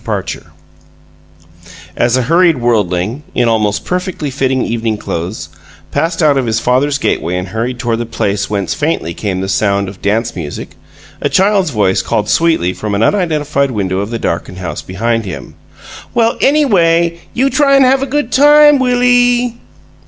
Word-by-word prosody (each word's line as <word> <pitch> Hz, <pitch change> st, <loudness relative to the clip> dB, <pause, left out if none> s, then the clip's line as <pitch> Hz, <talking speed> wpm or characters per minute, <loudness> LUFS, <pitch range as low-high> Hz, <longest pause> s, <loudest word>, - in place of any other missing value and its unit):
PARCHER -, -, -4 dB, 1.5 s
As 120 Hz, +1 st, +2 dB
a 130 Hz, -, +1 dB
hurried 165 Hz, +3 st, +3 dB
worldling, 110 Hz, 0 st, 0 dB
in 120 Hz, -, +2 dB
almost 105 Hz, -2 st, 0 dB
perfectly 180 Hz, -5 st, -3 dB
fitting 130 Hz, -1 st, 0 dB
evening 115 Hz, -2 st, -2 dB
clothes, 85 Hz, -2 st, -5 dB, 0.4 s
passed 165 Hz, -, -1 dB
out 145 Hz, -3 st, +4 dB
of 125 Hz, -, -2 dB
his 110 Hz, -1 st, 0 dB
father's 135 Hz, +4 st, +1 dB
gateway 90 Hz, -, -1 dB
and 90 Hz, 0 st, -4 dB
hurried 115 Hz, +4 st, -3 dB
toward 120 Hz, -3 st, -2 dB
the 120 Hz, -, -4 dB
place 100 Hz, -2 st, -2 dB
whence 100 Hz, -4 st, -2 dB
faintly 145 Hz, -, -2 dB
came 95 Hz, 0 st, -3 dB
the 95 Hz, -, -3 dB
sound 100 Hz, 0 st, 0 dB
of 95 Hz, 0 st, -10 dB
dance 115 Hz, +3 st, -1 dB
music, 80 Hz, -5 st, -7 dB, 0.5 s
a -, -, 0 dB
child's 195 Hz, -2 st, +2 dB
voice 105 Hz, -7 st, +1 dB
called 105 Hz, 0 st, -2 dB
sweetly 160 Hz, -, +2 dB
from 105 Hz, 0 st, -4 dB
an 105 Hz, -, +1 dB
unidentified 150 Hz, -, 0 dB
window 95 Hz, -5 st, -2 dB
of 100 Hz, +2 st, -3 dB
the 115 Hz, -, -3 dB
darkened 90 Hz, -2 st, -3 dB
house 90 Hz, -1 st, -5 dB
behind 115 Hz, +5 st, -2 dB
him: 95 Hz, -, -8 dB, 0.6 s
"Well, 230 Hz, -1 st, +2 dB
ANYWAY, 170 Hz, -, +2 dB, 0.2 s
you 270 Hz, +3 st, +1 dB
try 280 Hz, -2 st, +3 dB
and 270 Hz, -1 st, +5 dB
have 265 Hz, +1 st, +3 dB
a 275 Hz, -, -2 dB
good 295 Hz, +2 st, -2 dB
time, 295 Hz, +1 st, +6 dB
Willie!" 245 Hz, -1 st, +2 dB
125 Hz, 165 wpm, -14 LUFS, -, 1.5 s, time